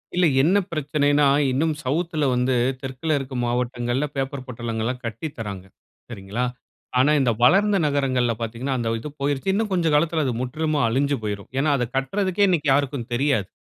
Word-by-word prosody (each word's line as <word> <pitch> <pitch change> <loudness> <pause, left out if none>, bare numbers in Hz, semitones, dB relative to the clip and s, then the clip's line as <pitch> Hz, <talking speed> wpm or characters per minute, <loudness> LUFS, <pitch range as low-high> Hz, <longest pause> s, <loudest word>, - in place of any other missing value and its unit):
இல்ல 180 0 +4 0.2
என்ன 175 +8 +4
பிரச்சனைன்னா, 145 -1 +2 0.2
இன்னும் 155 +5 +1
சவுத்‌ 165 +6 -1
ல - - +3
வந்து 125 +1 +1 0.3
தெற்க்குல 135 +4 -2
இருக்க 135 -1 -6
மாவட்டங்கள்ல 120 +2 -1
பேப்பர் 135 -1 -3
பொட்டலங்கள்லாம் 120 0 -3
கட்டி 115 +7 -4
தராங்க. 100 -4 -5 0.4
சரிங்களா, 105 +2 -3 0.5
ஆனா 135 +4 +4
இந்த 125 -3 +3
வளர்ந்த 200 +8 +5
நகரங்கள்ல 130 -4 +1
பார்த்தீங்கன்னா, 120 +4 -2
அந்த 115 -2 -1
இது 150 +6 -7
போயிருச்சு 140 +6 0
இன்னும் 210 +1 -1
கொஞ்சம் 165 -4 +1
காலத்துல 160 +1 +2
அது 130 - 0
முற்றிமா 155 +3 -1
அழிஞ்சு 140 +4 +1
போயிரும். 100 -1 -4
ஏனா, 150 +2 +2
அத 125 -2 -1
கட்றதுக்கே 190 +8 +1
இன்னைக்கு 160 -6 +1
யாருக்கும் 135 -3 -1
தெரியாது. 130 -5 +1
135 Hz, 160 wpm, -23 LUFS, 120-155 Hz, 0.5 s, வளர்ந்த